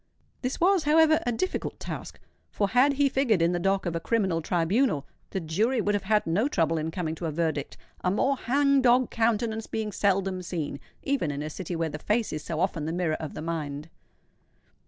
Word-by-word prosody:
This 255 Hz, +1 st, -2 dB
was, 365 Hz, -2 st, +3 dB
however, 315 Hz, +1 st, +5 dB
a -, -, +3 dB
difficult 370 Hz, +11 st, -2 dB
task; -, -, -7 dB, 0.3 s
for 200 Hz, -1 st, 0 dB
had 255 Hz, +6 st, +4 dB
he 280 Hz, 0 st, +3 dB
figured 260 Hz, -7 st, +2 dB
in 165 Hz, +1 st, +3 dB
the 175 Hz, -, 0 dB
dock 195 Hz, +2 st, +1 dB
of 170 Hz, -1 st, -2 dB
a -, -, 0 dB
criminal 190 Hz, -4 st, 0 dB
tribunal, 175 Hz, -, +1 dB, 0.2 s
the 190 Hz, -, -2 dB
jury 210 Hz, +10 st, 0 dB
would 205 Hz, -1 st, +1 dB
have 205 Hz, -1 st, -1 dB
had 210 Hz, +1 st, +2 dB
no 190 Hz, +10 st, +1 dB
trouble 165 Hz, -, +1 dB
in 155 Hz, +1 st, -2 dB
coming 160 Hz, -1 st, -3 dB
to 165 Hz, +1 st, -4 dB
a -, -, -2 dB
verdict, 155 Hz, -3 st, -2 dB, 0.3 s
a -, -, +2 dB
more 265 Hz, +8 st, +2 dB
hang 275 Hz, +2 st, +2 dB
dog 250 Hz, 0 st, +4 dB
countenance 225 Hz, -1 st, 0 dB
being 220 Hz, -1 st, -3 dB
seldom 195 Hz, -2 st, 0 dB
seen, 160 Hz, -5 st, -4 dB, 0.2 s
even 270 Hz, -, 0 dB
in 145 Hz, 0 st, -3 dB
a 155 Hz, -, -5 dB
city 180 Hz, +1 st, -5 dB
where 165 Hz, -1 st, -1 dB
the 150 Hz, +1 st, -6 dB
face 215 Hz, +6 st, 0 dB
is 155 Hz, -, -4 dB
so 160 Hz, -2 st, -4 dB
often 170 Hz, -4 st, 0 dB
the 160 Hz, -, -2 dB
mirror 170 Hz, -2 st, 0 dB
of 155 Hz, -, -6 dB
the 155 Hz, -, -5 dB
mind. 155 Hz, -2 st, -4 dB
195 Hz, 210 wpm, -27 LUFS, 165-240 Hz, 0.3 s, however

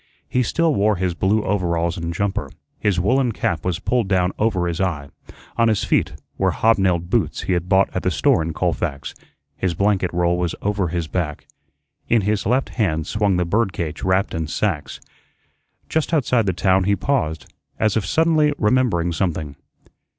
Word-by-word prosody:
He 125 Hz, -, +1 dB
still 165 Hz, +5 st, +1 dB
wore 105 Hz, -2 st, +2 dB
his 90 Hz, -1 st, -1 dB
blue 100 Hz, +5 st, +1 dB
overalls 85 Hz, -3 st, 0 dB
and 85 Hz, -2 st, -4 dB
jumper; 95 Hz, -3 st, -2 dB, 0.3 s
his 100 Hz, -4 st, +1 dB
woollen 125 Hz, +5 st, +2 dB
cap 90 Hz, -9 st, -2 dB
was 90 Hz, -2 st, -1 dB
pulled 120 Hz, +3 st, 0 dB
down 90 Hz, -1 st, +2 dB
over 105 Hz, -5 st, +1 dB
his 85 Hz, +1 st, -2 dB
eye; 75 Hz, -7 st, -2 dB, 0.5 s
on 115 Hz, 0 st, +4 dB
his 110 Hz, -2 st, +1 dB
feet -, -, +1 dB, 0.3 s
were -, -, +3 dB
hob 115 Hz, -1 st, +2 dB
nailed 90 Hz, -2 st, 0 dB
boots 105 Hz, -10 st, 0 dB
he 95 Hz, -, -1 dB
had 90 Hz, 0 st, -2 dB
bought 95 Hz, 0 st, +4 dB
at -, -, -1 dB
the -, -, 0 dB
store -, -, +2 dB
in 80 Hz, +1 st, -2 dB
Colfax; 70 Hz, -2 st, -2 dB, 0.4 s
his 90 Hz, -3 st, -1 dB
blanket 100 Hz, -1 st, +1 dB
roll 85 Hz, 0 st, +1 dB
was 85 Hz, -2 st, -1 dB
over 100 Hz, -2 st, 0 dB
his 85 Hz, -1 st, -3 dB
back; 80 Hz, -4 st, -3 dB, 0.6 s
in 115 Hz, -2 st, +4 dB
his 105 Hz, 0 st, -1 dB
left 130 Hz, +4 st, +1 dB
hand 80 Hz, -9 st, -1 dB
swung 105 Hz, -3 st, +1 dB
the 90 Hz, -, +1 dB
bird 100 Hz, +2 st, 0 dB
cage 80 Hz, -2 st, -4 dB
wrapped 95 Hz, +1 st, +1 dB
in 80 Hz, -1 st, -2 dB
sacks. 85 Hz, -3 st, -2 dB, 0.9 s
Just 160 Hz, +1 st, 0 dB
outside 125 Hz, -6 st, +1 dB
the -, -, +3 dB
town 95 Hz, +2 st, +2 dB
he 100 Hz, +1 st, +3 dB
paused, 110 Hz, -, -2 dB, 0.2 s
as 110 Hz, -2 st, +1 dB
if 110 Hz, -, +1 dB
suddenly 155 Hz, -, +2 dB
remembering 105 Hz, -7 st, +1 dB
something. 80 Hz, -4 st, -2 dB
95 Hz, 180 wpm, -21 LUFS, 85-110 Hz, 0.9 s, on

